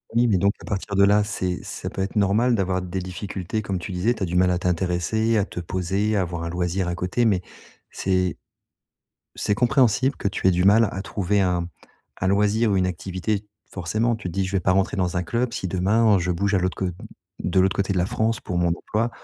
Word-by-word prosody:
Oui 120 +1 +4
mais 100 -5 +3
donc 100 +2 +2
à - - -12
partir 100 0 -3
de 100 - +5
là 105 +1 +5
c'est 95 -3 -3
ça - - -6
peut - - -4
être 95 +3 -3
normal 110 +4 +3
d'avoir 95 -2 0
des 90 +1 -5
difficultés 95 +2 -4
comme 100 -3 -3
tu 90 +2 -6
disais, 95 +7 +1
tu 110 - -4
as - - +2
du 90 0 -4
mal 90 0 +4
à 90 - +1
t'intéresser, 90 +5 0
à 100 - +2
te 90 - -7
poser, 95 +5 -1
à 100 - +2
avoir 85 -2 -3
un 85 - -3
loisir 90 +1 -1
à 85 - -2
côté 90 +7 0
mais 100 -5 +2 0.5
c'est 95 -2 0 1.0
c'est 105 - +1
compréhensible 125 +2 +2
que - - -4
tu 100 - -3
aies - - +6
du 90 0 +1
mal 105 +3 +5
à 95 - -5
trouver 100 0 0
un 90 -2 0 0.5
un 95 - 0
loisir 105 +3 +2
ou - - +2
une 95 -1 +2
activité 95 +4 -3 0.2
forcément 110 +6 -1
tu 110 - -8
te - - -6
dis: 95 +2 0
«Je 95 - -6
vais 95 - +1
pas 95 - +2
rentrer 95 +1 +1
dans 90 -2 0
un 90 - +1
club 120 +6 -1
si 95 - -3
demain 100 +3 +3
je 90 +1 0
bouge 100 +4 0
à - - +4
l'autre 90 0 -1
cô 95 - -1 0.5
de 95 +1 +2
l'autre 95 +1 +2
côté 100 0 0
de 95 - 0
la 90 - +1
France 110 +2 0
pour 90 - -4
mon 85 -1 +2
emploi, 110 +7 -1
95 Hz, 240 wpm, -23 LUFS, 90-105 Hz, 1.0 s, aies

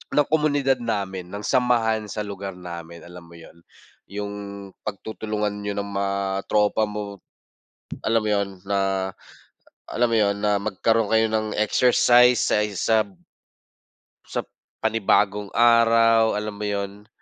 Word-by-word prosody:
ng 145 -1 +3
komunidad 145 -4 +2
namin, 95 -5 -3
ng 100 +3 -7
samahan 115 -3 +1
sa 105 +2 -4
lugar 100 -1 -6
namin 85 -1 -9
alam 90 0 -12
mo 85 - -16
yun, 85 0 -14 0.5
yung 100 +1 -5 0.5
pagtutulungan 105 +1 -3
niyo 100 0 -3
ng 100 0 -3
mga 100 0 -2
tropa 105 +1 +2
mo, 105 -1 -6 0.9
alam 115 +1 +2
mo 110 - -3
yun. 100 -1 +1 0.2
Na 95 -1 0 0.8
alam 120 +1 0
mo 115 - +1
yun, 100 -1 +2
na 105 -1 +2
magkaroon 110 +2 0
kayo 110 0 +4
ng 110 -1 -1
exercise 125 +2 +5
sa 105 - +2
isab 105 0 0 1.1
sa - - -3 0.4
panibagong 105 -2 +1
araw, 115 -1 +5
alam 105 0 -4
mo 105 +1 -4
yun, 100 0 -4
105 Hz, 130 wpm, -23 LUFS, 100-115 Hz, 1.1 s, exercise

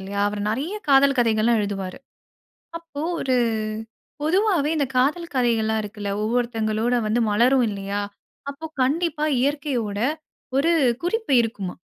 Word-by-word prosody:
இல்லையா, 200 +1 -4
அவர் 205 0 -4
நெறைய 280 - -2
காதல் 275 0 +5
கதைகள்லாம் 225 -1 +3
எழுதுவாரு. 195 -1 -4 0.8
அப்போ 325 -3 -8 0.2
ஒரு 260 -1 +1 0.9
பொதுவாவே 350 -2 +2
இந்த 285 - +2
காதல் 320 +7 +1
கதைகல்லாம் 220 -3 +1
இருக்குல. 205 -1 -6
ஒவ்வொருத்தவங்களோட 225 0 0
வந்து 235 +3 +1
மலரும் 245 +3 +4
இல்லையா! 200 0 -3 0.5
அப்போ 280 +3 -7 0.2
கண்டிப்பா 310 +2 0
இயற்கையோட 260 -7 -1 0.6
ஒரு 325 +5 +3 0.3
குறிப்பு 440 - 0
இருக்குமாம். 200 -6 -5
245 Hz, 115 wpm, -23 LUFS, 215-290 Hz, 0.9 s, காதல்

